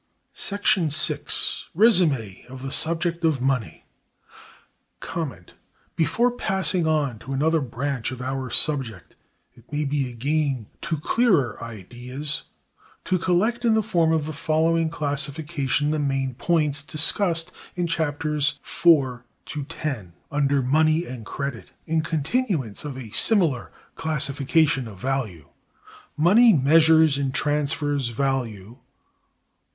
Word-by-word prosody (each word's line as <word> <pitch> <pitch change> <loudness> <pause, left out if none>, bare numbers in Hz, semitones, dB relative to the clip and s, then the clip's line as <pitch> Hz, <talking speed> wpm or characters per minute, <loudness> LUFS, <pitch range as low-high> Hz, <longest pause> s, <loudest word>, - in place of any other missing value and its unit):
§ 200 -5 +1
6. 155 0 -1
Résumé 160 - +3
of 130 +1 -10
the 135 - -4
subject 170 +2 0
of 160 -5 +2
money. 130 -3 -2 2.1
Before 235 +9 +2
passing 190 -7 +2
on 145 -7 0
to 135 +5 -7
another 160 +4 +2
branch 135 -1 -3
of 130 - -7
our 130 0 -3
subject, 125 - 0 0.4
it 120 +3 -22
may 150 0 -1
be 140 -2 -1
a - - -10
gain 140 -1 -1 0.2
to 160 -1 -2
clearer 155 - +1
ideas 125 +7 -4 0.6
to 185 -1 +1
collect 215 +8 +1
in 230 -2 +3
the 220 - +2
form 170 -6 +2
of 160 -2 +1
the 155 - -5
following 160 +1 +1
classification 145 -1 0
the 155 - 0
main 135 -2 -1
points 150 +1 0
discussed 165 +3 0 0.2
(in 175 -1 -1
Chaps. 160 -3 -2 0.4
IV 140 -8 +3 0.3
to 145 -2 -5 0.2
X) 130 -10 -2 0.3
under 140 -2 +1
money 155 +5 +2
and 120 -3 -8
credit, 140 -5 -5 0.2
in 160 0 +1
continuance 160 - -2
of 145 -3 -6
a 120 -5 -8
similar 165 - +2 0.2
classification 140 -2 0
of 105 -3 -10
value: 110 - -3 0.7
Money 210 +9 +6
measures 160 0 +5
and 135 -1 -2
transfers 145 -3 -1
value. 120 -3 -3
145 Hz, 120 wpm, -24 LUFS, 130-165 Hz, 2.1 s, Money